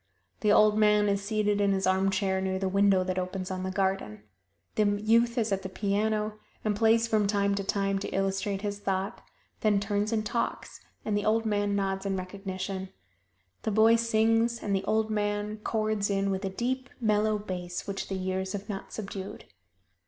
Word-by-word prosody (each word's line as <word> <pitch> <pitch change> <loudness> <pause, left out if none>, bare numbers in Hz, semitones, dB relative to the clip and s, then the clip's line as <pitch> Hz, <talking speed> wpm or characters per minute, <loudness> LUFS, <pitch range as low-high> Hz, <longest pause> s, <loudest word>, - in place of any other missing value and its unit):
The 210 - +2
old 215 0 +5
man 210 -1 +4
is 200 0 +1
seated 210 -1 +1
in 200 -1 +3
his 190 -1 0
armchair 190 0 +1
near 190 0 -1
the 190 0 -1
window 195 -1 +3
that 185 0 -1
opens 185 0 -4
on 185 0 -3
the 190 - -2
garden. 190 - -1 0.5
The 205 -1 +2
youth 230 +3 +3
is 225 -3 +1
at 195 -1 0
the 190 - -6
piano 210 +2 -1 0.3
and 210 -1 +1
plays 225 +2 +3
from 215 -3 +2
time 200 -1 +1
to 200 0 -1
time 195 0 0
to - - -4
illustrate 195 +1 -1
his 205 -1 -3
thought, 195 0 -2 0.4
then 210 -2 +3
turns 205 +1 -1
and 215 -1 0
talks, 235 +2 -3 0.2
and 210 - 0
the 205 - 0
old 225 +1 +2
man 205 -1 +1
nods 195 0 -1
in 195 -1 -1
recognition. 190 0 -5 0.7
The - - -2
boy 220 +2 +5
sings 230 0 +2
and 200 -1 0
the 190 - -1
old 220 0 +1
man 205 0 -1
chords 215 -1 -1
in 195 0 +1
with 190 +1 -2
a - - -1
deep, 250 +6 -2
mellow 215 -2 +2
bass 180 -3 -5
which 195 -1 -4
the 195 - -3
years 190 0 -2
have 200 0 -5
not 195 -2 -6
subdued. 195 -2 -6
205 Hz, 190 wpm, -28 LUFS, 195-215 Hz, 0.7 s, old